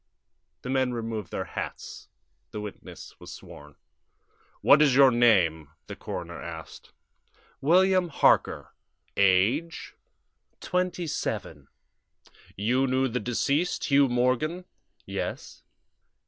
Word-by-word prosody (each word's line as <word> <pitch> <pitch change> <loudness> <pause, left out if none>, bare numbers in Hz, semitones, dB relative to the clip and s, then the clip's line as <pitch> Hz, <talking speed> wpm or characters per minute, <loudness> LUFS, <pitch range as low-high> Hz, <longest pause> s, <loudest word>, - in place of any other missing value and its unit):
The 125 - -6
men 130 -2 0
removed 115 -2 -5
their - - -4
hats. - - -7 0.4
The 105 - -7
witness 105 -1 -10
was - - -11
sworn. 75 0 -13 0.9
"What 150 - +6
is 140 -4 +4
your 135 -1 +7
name?" 90 - +3 0.2
the - - -8
coroner - - -7
asked. - - -10 0.7
"William 185 +3 +3
Harker." 155 - +2 0.4
"Age?" 100 - +1 0.7
"Twenty 180 -1 -2
seven." 155 - -4 0.9
"You 125 +7 +1
knew 130 +1 +1
the 125 +2 -2
deceased, 140 +8 -1
Hugh 140 -1 +5
Morgan?" 130 +9 0 0.4
"Yes." - - -6
130 Hz, 105 wpm, -26 LUFS, 115-155 Hz, 0.9 s, your